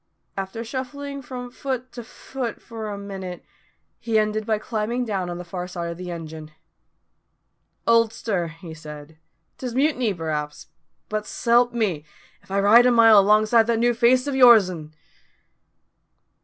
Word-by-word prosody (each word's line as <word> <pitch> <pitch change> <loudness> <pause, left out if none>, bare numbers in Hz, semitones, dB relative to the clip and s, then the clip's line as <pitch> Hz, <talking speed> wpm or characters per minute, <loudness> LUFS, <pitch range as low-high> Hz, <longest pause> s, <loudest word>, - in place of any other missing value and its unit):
After 195 +4 -5
shuffling 280 +3 -6
from 250 -1 -8
foot 255 -1 -4
to 240 - -8
foot 245 +1 -6
for 225 -2 -8
a 205 - -5
minute, 190 -3 -7 0.5
he 225 -2 0
ended 215 0 0
by 220 -1 +2
climbing 225 +3 -2
down 195 -5 -2
on 175 - -5
the 180 - -6
far 180 +1 -6
side 170 -2 -5
of 170 - -8
the 180 -1 -6
engine. 160 -2 -7 1.4
"Oldster," 225 -5 +1
he 165 0 -10
said, 155 0 -11 0.4
"'tis 250 -2 -5
mutiny 260 -5 +1
p'raps; 155 -4 -4 0.4
but 215 0 -3
s'help 240 +1 +2
me, 200 -11 -1 0.4
if - - -26
I 195 +1 0
ride 225 +5 +6
a - - +4
mile 225 -3 +7
longside 215 +3 +4
that 235 -1 +1
new 240 +1 +2
face 250 +3 +3
o' - - -1
your'n!" 195 - +4
215 Hz, 150 wpm, -23 LUFS, 180-240 Hz, 1.4 s, mile